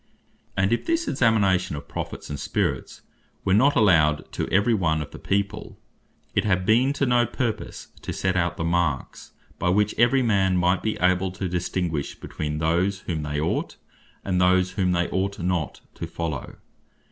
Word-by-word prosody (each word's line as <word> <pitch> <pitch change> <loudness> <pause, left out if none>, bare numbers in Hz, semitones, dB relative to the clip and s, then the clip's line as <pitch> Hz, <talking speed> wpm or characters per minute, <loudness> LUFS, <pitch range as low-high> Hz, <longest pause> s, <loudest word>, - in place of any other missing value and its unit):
And 95 +3 +2
if 120 - -1
this 330 0 +1
examination 105 - +2
of 70 - -8
Prophets, - - -6
and 70 - -4
Spirits, - - -2 0.4
were 95 - +3
not 135 +8 +4
allowed 80 -9 +3
to - - -3
every 100 +5 +3
one 80 -7 +1
of 75 -1 -6
the - - -10
people, 100 +2 -2 0.6
it - - +2
had 95 -3 +1
been 120 +6 +4
to 140 - 0
no 120 -2 +3
purpose, 120 -1 -4
to - - -5
set 95 -1 -1
out 85 -1 0
the - - -2
marks, 85 -5 -1 0.3
by 90 - +1
which 105 +3 +2
every 125 +3 +4
man 95 -5 +2
might 90 +1 +2
be 110 - -2
able, 90 +1 +2
to 95 0 -3
distinguish 90 -3 -2
between 75 -1 -4
those, 90 +5 +1
whom 80 -5 -3
they 75 0 -3
ought, 80 +3 -2 0.5
and 90 -2 +1
those 90 0 +3
whom 95 -3 0
they 85 -1 +1
ought 100 +1 -1
not 90 -3 -2
to - - -6
follow. 80 -6 -5
95 Hz, 175 wpm, -24 LUFS, 85-105 Hz, 0.6 s, not